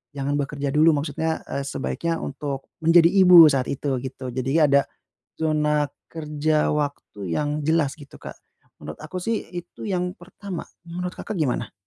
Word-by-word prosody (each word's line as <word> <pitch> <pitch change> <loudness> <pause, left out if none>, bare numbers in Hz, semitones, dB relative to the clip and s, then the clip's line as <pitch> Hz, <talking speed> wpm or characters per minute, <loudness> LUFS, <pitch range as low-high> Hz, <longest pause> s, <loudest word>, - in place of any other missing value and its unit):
jangan 140 +1 -1
bekerja 140 0 -2
dulu. 155 +3 +5
Maksudnya, 160 +2 -2
eee, 140 - -3
sebaiknya 165 +5 -2
untuk 140 -1 -5
menjadi 165 +1 +6
ibu 180 -3 +9
saat 135 -2 0
itu, 135 -1 -2
gitu. 130 0 -6
Jadinya 130 +5 +1
ada, 140 0 +5 0.6
zona 150 -2 +1 0.2
kerja 155 -1 0
waktu 145 - -3
yang 150 0 -1
jelas, 160 -3 +2
gitu 145 -1 -13
Kak. - - -9 0.5
Menurut - - -8
aku 185 - -5
sih, 230 +1 -1
itu 175 -1 -8
yang 180 -2 -1
pertama, 185 0 -8 0.2
menurut 180 +1 -4
Kakak 215 - -6
gimana? 125 -6 -1
150 Hz, 150 wpm, -23 LUFS, 140-170 Hz, 0.6 s, ibu